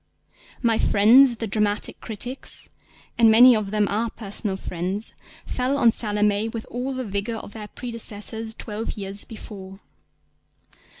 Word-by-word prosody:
My 230 -2 +3
friends 240 +5 +6
the 225 - -4
dramatic 210 0 -1
critics 240 +4 -6 0.5
(and 230 -1 +7
many 240 +3 +8
of 215 -2 -2
them 210 0 +1
are 225 +3 0
personal 205 -2 -3
friends) 185 +4 -4 0.3
fell 260 +2 -1
on 235 -4 +5
Salomé 210 0 +2
with 225 -1 -6
all 255 +3 -3
the 255 -1 -4
vigour 205 +3 -3
of 205 - -9
their 215 -2 -7
predecessors 225 -1 -3
twelve 220 0 -5
years 200 0 -3
before. 195 -3 -10
220 Hz, 135 wpm, -23 LUFS, 205-235 Hz, 0.5 s, many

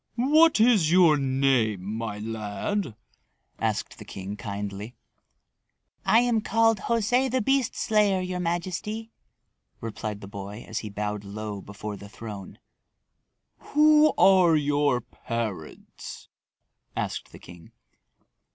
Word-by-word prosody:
"What 300 +4 +5
is 215 -9 +4
your 175 -4 +6
name, 130 -7 +1
my 110 +1 -4
lad?" 110 - -3 0.6
asked - - -2
the - - -8
king 95 +1 -7
kindly. 100 +2 -6 1.1
"I 220 +4 +5
am 240 -2 +1
called 225 -1 +2
José 235 +5 +1
the 260 +1 +1
Beast 270 +1 +1
Slayer, 210 -3 +2
your 180 0 -3
majesty," 185 +6 -3 0.7
replied 110 -2 -5
the 100 - -8
boy 100 +2 -8
as 110 - -3
he 110 - -6
bowed 105 0 -4
low 105 0 -6
before 105 +1 -7
the 100 +1 -11
throne. 105 -3 -9 1.0
"Who 305 +1 +5
are 185 -4 +6
your 145 -3 +2
parents?" 115 -7 -6 0.7
asked - - -4
the - - -11
king. 85 -2 -14
135 Hz, 115 wpm, -26 LUFS, -, 1.1 s, your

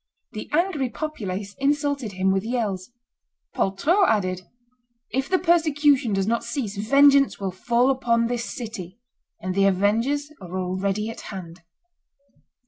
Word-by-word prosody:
The 215 - -7
angry 310 -5 +1
populace 205 -11 -5
insulted 285 -5 0
him 190 +1 +1
with 195 0 0
yells; 220 -5 -2 0.6
Poltrot 310 - +2
added, 185 -4 0 0.7
"If 265 +1 -1
the 370 - +3
persecution 295 -7 +3
does 195 -1 +1
not 230 +2 0
cease, 235 -4 -3
vengeance 275 +6 +4
will 195 -1 -2
fall 240 +7 +2
upon 235 -3 +1
this 235 0 -2
city, 215 -6 -7 0.4
and 185 +1 -3
the 195 +1 +3
avengers 230 +10 +1
are 180 0 -6
already 195 +4 -1
at 225 - -9
hand." 175 -3 -8
230 Hz, 135 wpm, -24 LUFS, 195-280 Hz, 0.7 s, vengeance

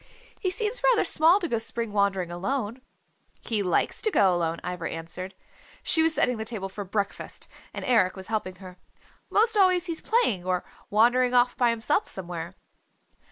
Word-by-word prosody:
He 375 - 0
seems 435 +5 -1
rather - - +4
small 330 +5 +5
to 350 - -2
go 230 -7 -1
spring 230 0 -3
wandering 195 -4 +1
alone." 225 +6 -3 0.6
"He 220 -3 -1
likes 180 -3 0
to 440 - +1
go 195 - +4
alone," 170 -1 -1
Ivra 180 -2 -4
answered. 170 +3 -6 0.5
She 320 - +3
was 320 0 +2
setting 250 -5 +1
the 220 - -3
table 215 -4 -5
for 205 +2 -6
breakfast, 200 +1 -4 0.2
and - - -6
Eric 215 -7 +3
was 190 -1 -8
helping 210 -4 -3
her. 185 -1 -12 0.5
"'Most 445 +2 +3
always 370 -3 +4
he's 335 -2 -3
playing 430 - +1
or 185 0 -1 0.3
wandering 245 +4 +3
off 245 0 +4
by 245 -2 +3
himself 235 - 0
somewhere." 175 -1 -6
220 Hz, 170 wpm, -26 LUFS, -, 0.6 s, small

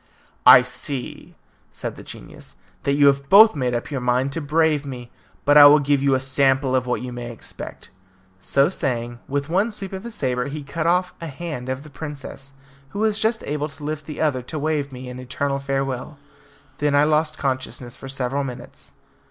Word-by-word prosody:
"I 125 0 +10
see," 125 +1 -7 0.3
said - - -6
the - - -11
genius, - - -11 0.3
"that 140 - +2
you 145 0 +4
have 140 0 +3
both 215 0 +8
made 125 -3 -1
up 120 - -4
your 135 -3 -2
minds 125 +2 0
to 165 - -2
brave 155 0 +2
me, 125 -3 -8 0.3
but 145 +1 +7
I 145 - +11
will 145 +1 +8
give 145 -1 +1
you 140 -1 +3
a - - +1
sample 135 0 +2
of 130 -1 0
what 125 - -1
you 125 -1 -6
may 120 0 -6
expect." 115 - -10 0.5
So 140 +8 +2
saying, 120 -8 -3
with 140 +1 -2
one 195 +7 +1
sweep 195 -2 -6
of 190 - -6
his 235 -1 -5
sabre 125 -4 -1
he 145 +1 -6
cut 155 +3 -3
off 180 +1 +1
a 165 - -5
hand 150 -4 -6
of 130 +1 -3
the 155 - -13
princess, 140 -2 -8 0.4
who 200 - -9
was 215 0 +2
just 220 +1 +1
able 150 +1 -2
to 145 +1 -12
lift 150 0 -4
the 150 - -7
other 145 -5 +1
to 140 +6 -7
wave 150 -2 -1
me 130 0 -8
an 125 0 -8
eternal 140 +2 -2
farewell. 135 +1 -3 0.6
Then 145 -1 +1
I 145 - +5
lost 155 +1 +1
consciousness 130 -2 -3
for 135 - -10
several 135 +1 -2
minutes. 125 -3 -9
140 Hz, 200 wpm, -22 LUFS, 130-155 Hz, 0.6 s, I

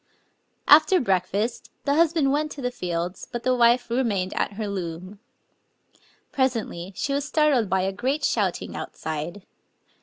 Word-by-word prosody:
After 315 +5 +7
break^t, 200 +2 -1 0.2
the 280 - +2
husband 320 -3 +3
went 300 +1 0
to 285 - -9
the 250 - -1
fields; 175 -3 -4
but 240 -1 -5
the 255 0 +2
wife 240 0 +4
remained 210 -7 0
at - - -1
her 210 +1 -4
loom. 185 0 -6 1.1
Presently 225 -9 -1
she 280 - -2
was 280 +1 0
startled 280 -9 +2
by 190 0 +2
a 190 +1 0
great 265 +9 -1
shouting - - -1
outside. 160 +5 -5
235 Hz, 145 wpm, -24 LUFS, 185-275 Hz, 1.1 s, After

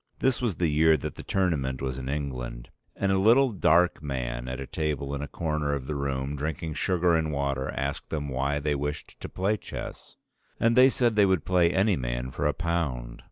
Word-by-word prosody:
This 130 -1 +1
was 115 -7 0
the 85 - +1
year 80 +1 +4
that - - -5
the - - -9
Tournament 75 -9 0
was 65 -1 -3
in 65 0 -5
England. 65 -4 -4 0.2
And 100 -1 0
a 95 - +3
little 120 +6 +5
dark 90 -3 +3
man 60 -4 -3
at 65 +1 -4
a 70 - -4
table 75 -2 -2
in 70 - -3
a 75 - -4
corner 75 0 -2
of 65 -2 -5
the 75 - -3
room, 70 0 -2
drinking 80 +3 -3
sugar 90 +2 +2
and 80 -1 +1
water, 70 -2 -1
asked 70 0 -3
them 75 -2 -3
why 70 +2 -1
they 75 0 0
wished 75 +1 -4
to - - -7
play 100 +4 0
chess; - - -8 0.4
and 115 0 +3
they 130 +1 +8
said 120 -4 +1
they 105 -2 +5
would 95 -5 +1
play 90 -2 +4
any 95 +1 +2
man - - -3
for - - -1
a 75 - +1
pound. 70 -9 -2
75 Hz, 210 wpm, -27 LUFS, 70-90 Hz, 0.4 s, they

